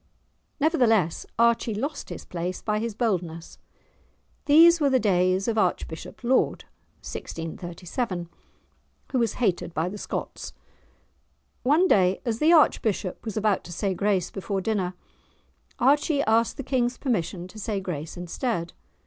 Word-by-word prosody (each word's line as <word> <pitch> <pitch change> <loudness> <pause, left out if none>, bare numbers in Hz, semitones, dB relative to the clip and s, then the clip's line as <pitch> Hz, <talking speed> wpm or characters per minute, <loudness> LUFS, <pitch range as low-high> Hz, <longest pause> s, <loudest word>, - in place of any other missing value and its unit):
Nevertheless, 235 - +2
Archie 235 -1 +2
lost 285 +8 -4
his - - -8
place 180 +1 -4
by 210 -1 0
his 225 -1 -3
boldness. 175 -8 -2 0.9
These 330 +3 +7
were 285 - +4
the 260 -1 +3
days 185 -2 +2
of 225 -1 +1
Archbishop 175 +1 -2
Laud 255 +2 +2 0.4
(1637), 175 +3 -5 0.8
who 260 - +1
was 230 -3 +1
hated 185 -7 -1
by 160 +2 0
the 205 +2 -7
Scots. - - -5 1.1
One 310 +8 +4
day, 185 - +3
as 230 -2 -1
the 315 +2 +4
archbishop 220 - +2
was 220 -2 -5
about 215 -2 +1
to - - -9
say 190 +3 -1
grace 190 -2 0
before 195 0 -3
dinner, 190 -3 -1 0.8
Archie 285 +3 +3
asked 225 +2 +2
the 275 - -4
King's 250 -1 0
permission 185 - -2
to 215 - -11
say 210 -1 -2
grace 165 -5 -5
instead. 175 +1 -3
210 Hz, 135 wpm, -26 LUFS, 180-245 Hz, 1.1 s, These